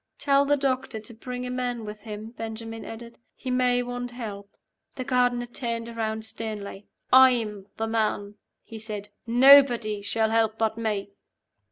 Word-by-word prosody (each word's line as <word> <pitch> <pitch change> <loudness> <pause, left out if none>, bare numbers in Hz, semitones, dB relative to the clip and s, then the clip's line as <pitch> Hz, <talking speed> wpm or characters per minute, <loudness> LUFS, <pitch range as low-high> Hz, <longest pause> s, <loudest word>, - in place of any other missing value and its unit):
"Tell 280 0 +3
the 290 +1 +3
doctor 265 -4 -1
to 215 +2 -9
bring 250 +2 -6
a 250 - -4
man 245 -2 -2
with 210 0 -7
him," 215 0 -7
Benjamin 225 -1 -7
added. 235 +1 -9 0.2
"He 260 - -5
may 250 -1 +2
want 245 0 -4
help." 210 -5 -7 0.5
The 260 - -4
gardener 245 -2 +1
turned 235 -1 -4
around 220 -1 -3
sternly. 210 -3 -6 0.3
"I'm 230 -6 +5
the 225 - -1
man," 215 -2 -1 0.3
he 225 - -9
said. 210 -2 -6 0.2
"Nobody 240 -4 +6
shall 220 +2 0
help 225 -1 +2
but 220 -1 +1
me." 210 -3 -2
230 Hz, 155 wpm, -26 LUFS, 220-250 Hz, 0.5 s, Nobody